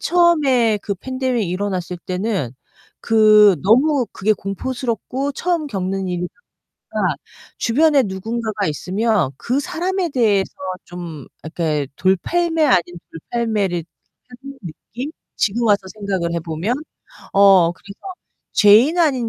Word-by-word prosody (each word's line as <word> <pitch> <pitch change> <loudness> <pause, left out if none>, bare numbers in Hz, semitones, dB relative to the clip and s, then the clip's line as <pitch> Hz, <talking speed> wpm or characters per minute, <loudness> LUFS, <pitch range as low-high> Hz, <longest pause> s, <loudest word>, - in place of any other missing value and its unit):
처음에 285 -11 +3
그 200 - -2
팬데믹 255 -1 -2
일어났을 185 -1 -3
때는 185 - -3 0.5
그 215 -3 +6
너무 255 +6 +3
그게 215 +3 +1
공포스럽고 250 +6 -3
처음 340 +1 -1
겪는 190 -3 -3
일이다 180 0 -3 0.6
보니까 - - 0 0.4
주변에 285 +3 +3
누군가가 215 +1 -3
있으면 190 - 0
그 260 +4 -1
사람에 365 +4 -2
대해서 215 -7 +1 0.3
좀 170 -6 -8 0.2
이렇게 155 -2 -2
돌팔매 325 - +1
아닌 255 - +4 0.3
돌팔매를 200 -2 -2 0.4
하는 270 +2 -12
느낌? 235 - -7 0.3
지금 230 +3 0
와서 205 -1 +4
생각을 195 -5 -2
해 170 - -1
보면. 165 +8 -2 0.6
어 195 -4 +6
그래서 200 +3 -14 0.5
죄인 225 +11 +5
아닌 265 -8 +2
215 Hz, 265 characters per minute, -19 LUFS, 185-260 Hz, 0.6 s, 그